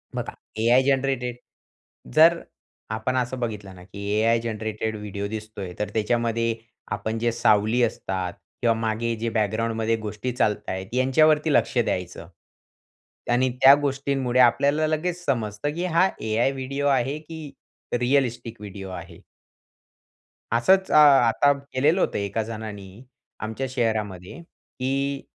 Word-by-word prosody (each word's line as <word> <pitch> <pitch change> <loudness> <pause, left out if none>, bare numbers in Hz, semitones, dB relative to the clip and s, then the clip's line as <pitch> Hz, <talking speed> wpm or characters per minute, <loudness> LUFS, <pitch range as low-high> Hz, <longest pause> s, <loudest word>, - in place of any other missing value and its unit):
बघा - - -4 0.3
AI 120 +4 +4
generated 135 -2 0 0.8
जर 165 +2 +6 0.6
आपण 120 +4 -2
असं 125 +1 -2
बघितलं 105 -5 -5
ना 90 - -13
की 100 +2 -9
AI 115 +1 +3
जनरेटेड 110 -1 -3
व्हिडिओ 100 -1 -5
दिसतोय, 105 -4 -7
तर 105 - -2
त्याच्यामध्ये 115 +1 0 0.4
आपण 110 +1 -2
जे 120 0 +1
सावली 110 +1 +2
असतात 95 -5 -2 0.3
किंवा 115 -1 +3
मागे 115 +1 -1
जे 115 - 0
बॅकग्राउंडमध्ये 110 +1 0
गोष्टी 105 +4 -4
चालत 110 -4 0
आहेत 95 0 -4
यांच्यावरती 150 +4 +3
लक्ष - - +2
द्यायचं 90 -7 -2 1.0
त्यांनी 125 +2 +2
त्या 135 +1 +10
गोष्टींमुळे 135 -2 0
आपल्याला 140 +5 +4
लगेच 175 +3 -2
समजतं 120 +2 -1
की 175 +2 -2
हा 185 +3 +5
AI 110 +4 +1
व्हिडिओ 135 +1 -3
आहे 135 +1 +1
की 155 -2 -9 0.5
रिॲलिस्टिक 120 -4 0
व्हिडिओ 95 -1 -8
आहे. 95 - -9 1.3
असंच 190 +12 +3
अ, - - +1 0.3
आता 130 +5 +3 0.2
केलेलं 150 +8 +2
होतं - - 0
एका 100 +2 -2
जणांनी 105 -1 -8 0.4
आमच्या 110 +5 -4
शहरामध्ये 110 - -2 0.4
की 135 +1 -1
115 Hz, 130 wpm, -24 LUFS, 110-135 Hz, 1.3 s, त्या